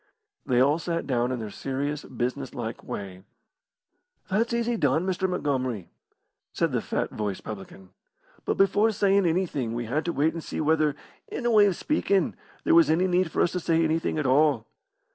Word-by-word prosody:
They 125 -1 +3
all 145 +5 +4
sat 170 0 -2
down 125 -2 0
in 130 - -1
their 110 -3 -6
serious, 140 +4 -3
business 130 +3 -4
like 115 -3 -5
way. 95 -2 -6 1.1
"That's 220 +5 +1
easy 235 0 0
done, 155 - +1
Mr. 190 0 0
Montgomery," 130 - -2 0.6
said - - 0
the - - 0
fat - - -2
voiced 105 -3 -4
publican. 95 -2 -9 0.5
"But - - -1
before 200 +3 +4
sayin' 200 -2 +3
anything 160 -9 -1
we 120 0 -3
had 145 +8 -1
to 170 - 0
wait 155 +1 +1
and 165 -1 -6
see - - -5
whether, 155 -2 +2 0.3
in 245 - -5
a 240 - +3
way 210 -2 +6
of 190 - 0
speakin', 200 - +1 0.3
there - - +3
was 165 -2 +6
any 165 +4 +3
need 180 -1 +2
for - - +1
us - - +1
to 180 - -2
say 165 -1 +2
anything 160 0 0
at 150 - -1
all. 135 -3 +3
155 Hz, 185 wpm, -26 LUFS, 125-180 Hz, 1.1 s, way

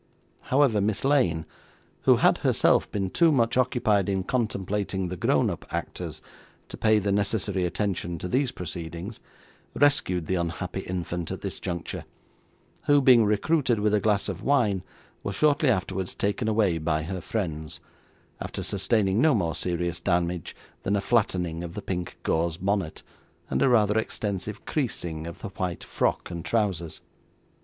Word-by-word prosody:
However, 130 -6 +2
Miss 105 +4 0
Lane 105 - +2 0.6
(who - - +7
had - - +3
herself - - +3
been 95 -2 -2
too 170 -2 +4
much 115 -5 +2
occupied 115 -6 +2
in 95 -1 0
contemplating 100 -5 -1
the 90 - -4
grown - - +2
up - - -3
actors, - - -5 0.5
to - - -6
pay 110 0 +3
the 100 -1 0
necessary 100 -2 0
attention 90 -2 -2
to 90 - -5
these 130 +7 +1
proceedings) 85 +1 -6 0.6
rescued 140 - +2
the 95 - -1
unhappy 90 +2 -2
infant 90 -3 -4
at - - -5
this - - -4
juncture, 85 -3 -4 0.8
who, 145 0 +6
being 125 -4 +6
recruited 120 +3 +2
with 105 0 +2
a 105 - +4
glass 105 -1 +1
of - - -4
wine, 110 -9 +2 0.4
was 100 - -4
shortly 150 - +3
afterwards 95 -4 -1
taken 105 +3 -1
away 105 -6 +2
by 80 0 0
her 90 +2 -4
friends, 80 -7 -3 0.6
after - - -4
sustaining 100 +1 +2
no 155 -3 +5
more 85 -6 0
serious 85 -1 -1
damage 85 -2 -1 0.3
than 100 - 0
a - - +2
flattening 90 -7 0
of 85 0 -7
the 105 - -4
pink 90 -2 -4
gauze 80 0 0
bonnet, 95 -3 -1 0.5
and - - +1
a 135 - +5
rather 110 -3 +4
extensive 105 -1 -4
creasing 85 - -3
of 85 - -9
the - - -4
white 90 -2 -4
frock - - -1
and 85 -1 -5
trousers. 95 -8 -1
100 Hz, 155 wpm, -26 LUFS, 85-110 Hz, 0.8 s, who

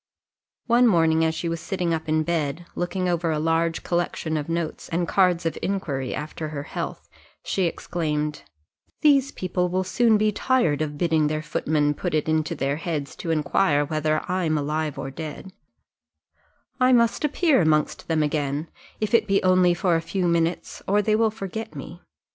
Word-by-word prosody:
One 240 +1 +5
morning 165 -5 +3
as 160 0 +1
she 170 - -3
was 165 0 -2
sitting 175 -2 -1
up 160 -1 -3
in 155 0 +2
bed, 160 0 -2
looking 180 +1 -2
over 170 -1 0
a 155 - 0
large 165 +1 0
collection 175 -2 -1
of 150 0 -3
notes, 165 -1 -3
and 170 +1 -1
cards 180 -3 +2
of 165 - -2
inquiry 145 -10 -2
after 155 +1 -5
her 145 -2 -5
health, - - -6 0.4
she 190 - 0
exclaimed 150 -3 -2 0.6
"These 280 -2 +4
people 180 -1 -1
will 185 +1 0
soon 220 +4 +3
be 215 0 +2
tired 210 - +1
of 150 -1 -3
bidding 160 -2 +2
their 155 +1 -2
footman 150 -1 0
put 150 - -3
it 155 - 0
into 160 +1 0
their 140 0 -1
heads 155 -4 -4
to 165 - -5
inquire 150 -1 +2
whether 155 0 0
I 185 0 0
am 155 -1 +1
alive 150 0 -2
or 135 0 -5
dead 160 +5 -7 1.3
I 255 0 +5
must 235 +2 +3
appear 300 - +3
amongst 155 -2 +1
them 160 -2 +1
again, 150 0 -1 0.3
if 215 0 -2
it 230 - +4
be 195 0 +2
only 185 -1 +4
for 175 -2 +1
a 165 - +1
few 180 +2 -1
minutes, 170 0 -1
or 205 +2 +3
they 215 +1 +2
will 225 0 +3
forget 220 +1 -6
me. - - -9
165 Hz, 180 wpm, -24 LUFS, 155-185 Hz, 1.3 s, One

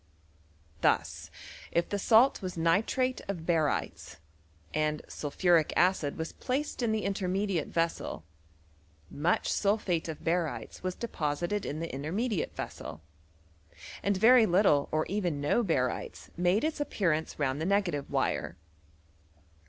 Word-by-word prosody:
Thus, - - +1 0.4
if 170 0 +1
the 205 - -1
salt 230 +6 +5
was 185 -2 -5
nitrate 215 +10 +1
of 180 -5 -4
barytes, 160 -4 -1 0.6
and 155 0 0
sulphuric 165 +2 +1
acid 175 -5 +2
was 160 0 -4
placed 270 +2 -3
in 235 -2 +1
the 220 -1 0
intermediate 195 -3 -1
ves 165 0 0
sel, 80 - -7 0.9
much 160 +5 0
sulphate 200 -5 0
of 160 -2 -6
barytes 165 -9 -2
was 185 0 -3
deposited 175 -1 -2
in 155 +2 -4
the 165 - -5
intermediate 175 - -2
vessel, 80 +1 -7 1.0
and 200 -1 +1
very 230 +2 +6
little 175 -6 +3
or 155 0 +1
even 180 -7 -1
no 145 +11 +2
bary 150 - 0
tes - - -15
made 180 +5 +2
its 310 -1 -1
appearance 165 - -1
round 140 0 -1
the - - -1
negative 190 -8 0
wire. - - -1
175 Hz, 130 wpm, -30 LUFS, 155-205 Hz, 1.0 s, very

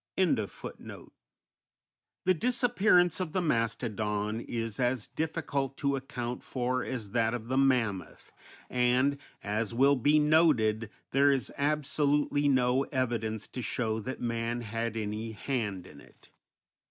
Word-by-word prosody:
_ 160 - -2 1.2
The 185 - +5
disappearance 210 -5 +3
of 180 -4 -3
the 185 - +1
mastodon 110 - -1
is 115 -3 -4
as 125 -2 +1
difficult 145 -4 -3
to 140 -1 +1
account 125 -2 -4
for 125 0 -1
as 115 -6 -5
that 115 0 +1
of 115 -1 -7
the 130 - 0
mammoth, 120 -8 0 0.4
and, 125 +3 +2 0.2
as 105 +2 -2
will 140 +3 +5
be 145 +4 +3
noted, 145 -9 +3 0.2
there 140 +1 +5
is 135 -2 -1
absolutely 145 0 +1
no 130 -1 +3
evidence 115 -5 -2
to 125 - -5
show 110 -1 -1
that 130 +5 -5
man 115 0 -2
had 115 0 -3
any 110 +1 -3
hand 105 -6 -3
in 70 -5 -13
it. - - -20
125 Hz, 130 wpm, -30 LUFS, 110-140 Hz, 1.2 s, The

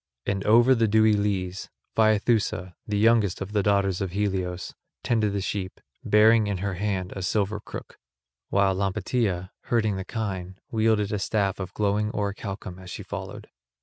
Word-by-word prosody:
And 100 -1 -1
over 120 +4 +6
the 115 -3 +2
dewy 110 +1 +4
leas 95 -3 -1 0.3
Phaethusa, 110 -4 +2
the 105 -1 -1
youngest 110 -3 +3
of 100 +1 -5
the 105 -1 +2
daughters 100 -2 +1
of 95 -3 -3
Helios, 95 -3 -2 0.3
tended 110 -3 +1
the 100 0 -2
sheep, 95 -1 -4 0.2
bearing 110 +1 +5
in 100 -2 -1
her 100 +1 -2
hand 95 -1 -2
a 95 - -4
silver 105 +2 0
crook; - - -9 0.5
while 100 -1 +3
Lampetia, 95 -1 -1
herding 110 -4 +1
the 95 - -3
kine, 95 -4 -4
wielded 110 -2 +2
a 105 - 0
staff 100 -1 0
of 95 -1 -6
glowing 105 0 +1
orichalcum 100 -2 -4
as 90 -1 -11
she - - -6
followed. - - -7
100 Hz, 160 wpm, -26 LUFS, 95-110 Hz, 0.5 s, over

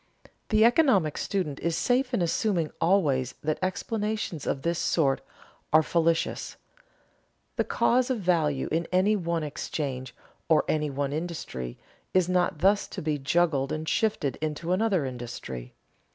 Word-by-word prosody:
The 220 0 +5
economic 235 - +4
student 175 -9 -2
is 170 0 -1
safe 250 +6 +1
in 225 -8 +1
assuming 170 -1 0
always 150 -8 +2
that 155 0 -1
explanations 210 - -2
of 135 - -1
this 170 0 0
sort 140 -5 +1 0.5
are 155 +1 +6
fallacious. 165 0 0 1.0
The - - +1
cause 250 +2 +2
of 255 - +1
value 160 -7 +1
in 165 +1 0
any 190 +4 +3
one 170 -4 -1
exchange 140 -3 -4 0.3
or 160 - +4
any 150 -1 0
one 140 0 -2
industry 155 - -5 0.4
is 185 -2 +4
not 180 -1 +1
thus 200 +3 +3
to - - -6
be 150 -1 -1
juggled 140 -1 +1
and 155 +1 -3
shifted 205 -11 0
into 155 +2 -2
another 190 -5 +2
industry. 115 - -7
165 Hz, 140 wpm, -27 LUFS, 145-190 Hz, 1.0 s, are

